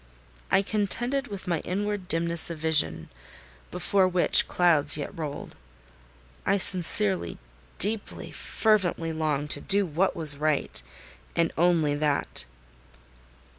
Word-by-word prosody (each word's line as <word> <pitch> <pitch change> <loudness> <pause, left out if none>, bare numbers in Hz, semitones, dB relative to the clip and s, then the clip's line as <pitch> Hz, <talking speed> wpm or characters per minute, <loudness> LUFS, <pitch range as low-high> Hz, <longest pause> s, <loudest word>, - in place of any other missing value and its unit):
I 195 - +3
contended 240 +7 0
with 200 -4 -8
my 170 -3 0
inward 200 +2 -3
dimness 170 -1 -1
of 170 - -6
vision, 150 - 0 0.6
before 195 - +1
which 180 -1 +3
clouds 155 -5 +3
yet 145 - -6
rolled. 150 -3 -7 0.9
I 200 - +1
sincerely, 185 - +1 0.4
deeply, 210 +2 -1
fervently 185 -7 0
longed 150 -2 -2
to - - +2
do 200 0 +3
what 180 +4 -1
was 155 -4 +5
right; 150 - -1 0.5
and 165 -1 0
only 165 -4 +2
that. 145 - -1
170 Hz, 115 wpm, -26 LUFS, 155-195 Hz, 0.9 s, was